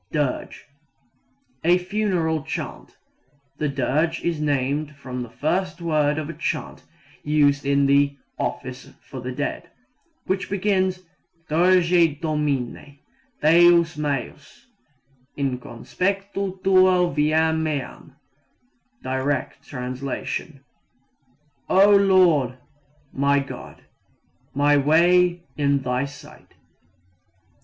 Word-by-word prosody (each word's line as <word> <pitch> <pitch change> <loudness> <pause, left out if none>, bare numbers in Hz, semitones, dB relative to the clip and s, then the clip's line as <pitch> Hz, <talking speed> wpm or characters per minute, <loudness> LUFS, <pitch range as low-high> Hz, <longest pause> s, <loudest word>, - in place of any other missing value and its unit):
Dirge 145 -4 -3 1.0
a 175 +2 +4
funeral 180 -4 -1
chant. 155 - -7 0.6
The 150 - 0
dirge 145 +5 -1
is 165 -3 -1
named 145 +1 -1
from 130 -2 -6
the 120 - -7
first 180 +9 -2
word 155 -3 +1
of 155 -2 -3
a 165 - -6
chant - - -4 0.4
used 145 -2 +2
in 140 0 +3
the 140 0 +3 0.2
"office 130 0 -5
for 130 +2 -9
the 125 +1 -5
dead," 140 +3 -4 0.6
which 190 0 -2
begins 190 -2 0 0.4
Dirige 170 -2 +3
Domine, 145 -3 -2 0.5
Deus 170 +1 +5
meus, 145 - -5 0.7
in 135 -3 -1
conspectu 195 - -3
tuo 185 -2 +4
viam 160 +2 +2
meam 150 -3 -5 0.9
(Direct, 130 +2 -3 2.0
O 200 +2 +6
Lord, 180 -10 +4 0.6
My 140 +1 +2
God, 140 -1 -6 0.7
my 145 +1 +4
way 175 +4 +3
in 140 -2 +1
Thy 125 +1 -1
sight). 140 -1 -14
150 Hz, 95 wpm, -23 LUFS, 140-175 Hz, 2.0 s, O